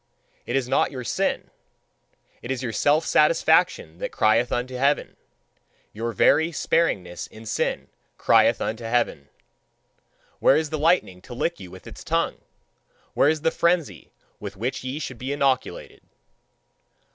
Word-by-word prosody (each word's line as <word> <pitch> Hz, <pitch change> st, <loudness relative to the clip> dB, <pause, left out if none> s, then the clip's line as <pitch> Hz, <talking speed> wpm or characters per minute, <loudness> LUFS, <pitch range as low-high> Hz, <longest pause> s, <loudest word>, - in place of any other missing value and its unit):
It -, -, -2 dB
is 135 Hz, -2 st, 0 dB
not -, -, +2 dB
your 130 Hz, -3 st, -6 dB
sin 115 Hz, -, -2 dB, 0.9 s
it 120 Hz, -, -9 dB
is 130 Hz, -1 st, -2 dB
your 120 Hz, -, -2 dB
self 150 Hz, +6 st, +2 dB
satisfaction 160 Hz, -, +2 dB
that -, -, -4 dB
crieth 115 Hz, +3 st, +2 dB
unto 125 Hz, +1 st, -2 dB
heaven; 140 Hz, +3 st, 0 dB, 0.8 s
your 115 Hz, +2 st, -3 dB
very 160 Hz, -, +3 dB
sparingness 95 Hz, -, -1 dB
in 110 Hz, +1 st, -14 dB
sin -, -, -2 dB, 0.3 s
crieth -, -, +4 dB
unto 115 Hz, +2 st, -3 dB
heaven! 115 Hz, -11 st, -1 dB, 1.1 s
Where -, -, +5 dB
is 155 Hz, -1 st, -2 dB
the 155 Hz, -, -2 dB
lightning 155 Hz, -, +1 dB
to 120 Hz, -, -10 dB
lick 170 Hz, +7 st, -2 dB
you 90 Hz, -, -10 dB
with 95 Hz, +1 st, -13 dB
its -, -, -11 dB
tongue? -, -, -1 dB, 0.7 s
Where 145 Hz, -, +4 dB
is 155 Hz, -1 st, 0 dB
the 165 Hz, -, +2 dB
frenzy 170 Hz, -, 0 dB, 0.3 s
with 95 Hz, -, -8 dB
which 125 Hz, +6 st, -3 dB
ye 130 Hz, +2 st, -4 dB
should 130 Hz, -6 st, -6 dB
be 130 Hz, +2 st, -4 dB
inoculated? 135 Hz, -2 st, -1 dB
130 Hz, 145 wpm, -24 LUFS, 115-155 Hz, 1.1 s, Where